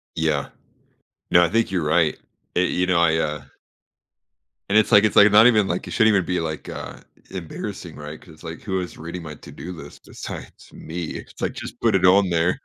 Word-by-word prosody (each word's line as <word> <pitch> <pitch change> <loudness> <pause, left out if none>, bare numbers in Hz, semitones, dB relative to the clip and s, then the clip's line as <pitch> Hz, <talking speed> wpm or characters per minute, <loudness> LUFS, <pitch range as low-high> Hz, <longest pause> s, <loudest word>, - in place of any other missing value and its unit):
Yeah. 80 -3 0 0.8
No, 85 - +6
I - - +1
think 115 +1 +1
you're 90 -5 -1
right. 80 0 +2 0.4
Eh 90 - +4
you 90 0 0
know, 90 -2 +2
I, 80 -1 +3
uh 75 -2 -2 1.3
And 105 - +4
it's 110 - +3
like 105 +1 +7
it's 110 - +1
like 105 0 +7
not 110 +3 +8
even 105 -5 +4
like, 85 - -3
it - - -7
shouldn't 110 -2 +4
even 95 -4 +2
be, 90 -1 -1
like, 80 -1 -5
uh, - - -7 0.3
embarrassing, 90 -5 -7
right, 75 +1 -8
'cause 80 - -15
it's 80 - -19
like, 80 0 -7
who 95 -3 -2
is 90 - -8
reading 85 +2 -7
my 75 -2 -8
to - - -13
do 90 +2 -8
list 80 - -12
besides - - -9
me? 85 +2 -6
It's - - -10
like, - - -1
just - - -8
put - - +3
it - - +3
on 95 0 +5
there. 85 +1 +1
90 Hz, 220 wpm, -22 LUFS, 80-95 Hz, 1.3 s, not